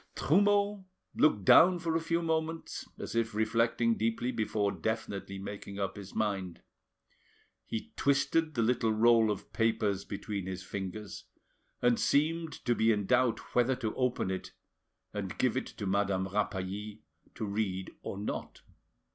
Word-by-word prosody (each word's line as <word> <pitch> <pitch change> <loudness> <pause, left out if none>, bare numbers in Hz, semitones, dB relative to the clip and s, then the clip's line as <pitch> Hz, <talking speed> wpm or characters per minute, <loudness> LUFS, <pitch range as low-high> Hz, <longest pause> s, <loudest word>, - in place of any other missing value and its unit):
Trumeau 205 +3 +2 0.3
looked 105 -11 +3
down 180 - +7
for 165 -1 -2
a 165 - +1
few 165 +1 0
moments, 160 0 -2
as - - -6
if 115 -2 0
reflecting 115 +1 +2
deeply 115 +2 0
before 110 -3 0
definitely 100 -3 -3
making 100 0 -7
up 95 -1 -2
his 100 -2 -10
mind. 95 -5 -2 1.0
He 110 - -5
twisted 155 +3 +1
the 115 - +2
little 115 -1 +2
roll 115 0 +5
of 105 - -4
papers 110 -4 +1
between 100 -1 -5
his 95 -1 -5
fingers, 100 +2 -6 0.6
and 120 -1 +4
seemed 160 +1 +1
to 120 - +3
be 115 -1 +3
in 105 -2 0
doubt 125 -1 +1
whether 125 +2 +3
to 115 -4 -3
open 125 -6 0
it 95 - -5 0.6
and - - -4
give - - +2
it - - -1
to - - -7
Madame 95 -1 +1
Rapally 105 +1 -3 0.3
to 110 - -3
read 100 -2 -2
or - - -5
not. 105 - -5
110 Hz, 145 wpm, -31 LUFS, 100-130 Hz, 1.0 s, down